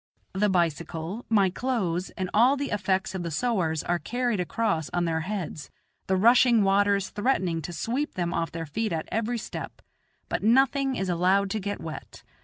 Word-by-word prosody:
The 205 Hz, +2 st, +2 dB
bicycle, 170 Hz, +3 st, -1 dB
my 200 Hz, -4 st, +3 dB
clothes, 190 Hz, -7 st, -1 dB
and 185 Hz, -, -1 dB
all 245 Hz, +6 st, +5 dB
the 280 Hz, 0 st, -3 dB
effects 190 Hz, 0 st, 0 dB
of 190 Hz, -, -3 dB
the 170 Hz, -, -3 dB
sowars 165 Hz, -, 0 dB
are 175 Hz, 0 st, 0 dB
carried 240 Hz, +5 st, -1 dB
across 180 Hz, -4 st, -1 dB
on 175 Hz, -1 st, +1 dB
their 165 Hz, -1 st, 0 dB
heads, 175 Hz, -4 st, -5 dB, 0.4 s
the 190 Hz, -, +2 dB
rushing 235 Hz, +2 st, +5 dB
waters 200 Hz, 0 st, +2 dB
threatening 190 Hz, -8 st, 0 dB
to 165 Hz, -, -6 dB
sweep 250 Hz, -, -2 dB
them 175 Hz, -1 st, -1 dB
off 165 Hz, 0 st, -1 dB
their 165 Hz, -1 st, -5 dB
feet 215 Hz, +8 st, -2 dB
at 160 Hz, -1 st, -3 dB
every 230 Hz, +2 st, -1 dB
step; 225 Hz, -, -7 dB, 0.5 s
but -, -, -2 dB
nothing 270 Hz, +4 st, +3 dB
is 190 Hz, -, -2 dB
allowed 185 Hz, +3 st, +2 dB
to 220 Hz, -, -1 dB
get 205 Hz, +1 st, -4 dB
wet. 155 Hz, -3 st, -8 dB
195 Hz, 180 wpm, -26 LUFS, 170-230 Hz, 0.5 s, all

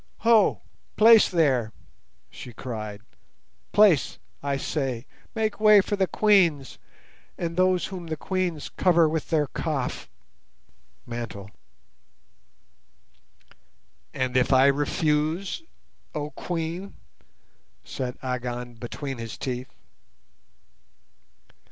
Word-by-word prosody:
"Ho! 225 Hz, -3 st, +4 dB, 0.3 s
place 225 Hz, 0 st, +7 dB
there," 130 Hz, -10 st, +1 dB, 0.6 s
she 125 Hz, -, -10 dB
cried; 110 Hz, -4 st, -6 dB, 0.7 s
"place, 205 Hz, -9 st, +4 dB, 0.2 s
I 140 Hz, -1 st, -1 dB
say; 135 Hz, -4 st, -3 dB, 0.3 s
make 220 Hz, -2 st, -1 dB
way 215 Hz, -1 st, +7 dB
for 205 Hz, +1 st, 0 dB
the 190 Hz, -2 st, +1 dB
Queens, 175 Hz, -12 st, +2 dB, 0.6 s
and 170 Hz, -1 st, -3 dB
those 185 Hz, 0 st, +2 dB
whom 180 Hz, -3 st, -7 dB
the 160 Hz, -1 st, -4 dB
Queens 180 Hz, -3 st, -2 dB
cover 170 Hz, -3 st, +3 dB
with 155 Hz, 0 st, -3 dB
their 155 Hz, -3 st, +2 dB
'kaf' 145 Hz, -2 st, -4 dB, 1.0 s
(mantle)." 115 Hz, -4 st, -7 dB, 2.6 s
"And 130 Hz, -2 st, -2 dB
if 130 Hz, +1 st, +3 dB
I 130 Hz, 0 st, +6 dB
refuse, 150 Hz, -, 0 dB, 0.5 s
oh 150 Hz, 0 st, -3 dB
Queen?" 170 Hz, +5 st, -5 dB, 0.9 s
said 125 Hz, -1 st, -5 dB
Agon 125 Hz, -1 st, -4 dB
between 125 Hz, +3 st, -6 dB
his 115 Hz, -1 st, -6 dB
teeth. 130 Hz, 0 st, -4 dB
150 Hz, 95 wpm, -25 LUFS, 125-185 Hz, 2.6 s, place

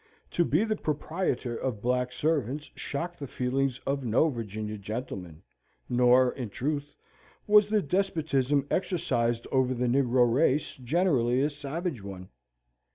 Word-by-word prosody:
To 175 Hz, -, +2 dB
be 160 Hz, +4 st, +2 dB
the 220 Hz, -1 st, 0 dB
proprietor 150 Hz, -, -2 dB
of 120 Hz, -3 st, -3 dB
black 125 Hz, +2 st, 0 dB
servants 145 Hz, 0 st, -1 dB
shocked 170 Hz, +5 st, -5 dB
the 140 Hz, -, -5 dB
feelings 130 Hz, +1 st, -1 dB
of 140 Hz, 0 st, -1 dB
no 125 Hz, +7 st, +3 dB
Virginian 110 Hz, -4 st, -5 dB
gentleman; 95 Hz, -7 st, -6 dB, 0.4 s
nor, 125 Hz, +1 st, +4 dB
in 125 Hz, -5 st, -5 dB
truth, 145 Hz, +6 st, -3 dB, 0.5 s
was 210 Hz, 0 st, +6 dB
the 210 Hz, -2 st, +2 dB
despotism 145 Hz, -6 st, +1 dB
exercised 120 Hz, -, 0 dB
over 130 Hz, -1 st, +2 dB
the 125 Hz, +1 st, -1 dB
negro 125 Hz, 0 st, +3 dB
race 140 Hz, +4 st, +2 dB
generally 130 Hz, -3 st, +2 dB
a 150 Hz, -, +1 dB
savage 145 Hz, -, -4 dB
one. 95 Hz, -2 st, -8 dB
130 Hz, 135 wpm, -28 LUFS, 120-150 Hz, 0.5 s, was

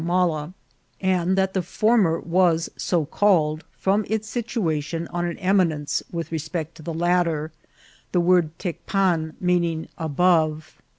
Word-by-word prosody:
timala, 170 Hz, -3 st, 0 dB, 0.5 s
and 185 Hz, -1 st, +1 dB
that 190 Hz, 0 st, +1 dB
the 190 Hz, -, +1 dB
former 195 Hz, -2 st, +2 dB
was 170 Hz, -1 st, +2 dB
so 170 Hz, -4 st, 0 dB
called 160 Hz, -3 st, +2 dB
from 200 Hz, +2 st, +1 dB
its 220 Hz, 0 st, -1 dB
situa 220 Hz, -, -1 dB
tion 165 Hz, +3 st, -4 dB
on 175 Hz, 0 st, -2 dB
an 170 Hz, -, -3 dB
eminence 180 Hz, -6 st, +1 dB
with 165 Hz, -2 st, -4 dB
respect 160 Hz, 0 st, -4 dB
to 165 Hz, -, -14 dB
the 165 Hz, -, -5 dB
latter, 165 Hz, -2 st, 0 dB, 0.6 s
the 180 Hz, -, +2 dB
word 175 Hz, -2 st, +3 dB
Tecpan 175 Hz, -3 st, -1 dB
meaning 170 Hz, -3 st, 0 dB
" -, -, -40 dB
above." 160 Hz, -1 st, +2 dB
175 Hz, 140 wpm, -23 LUFS, 160-185 Hz, 0.6 s, word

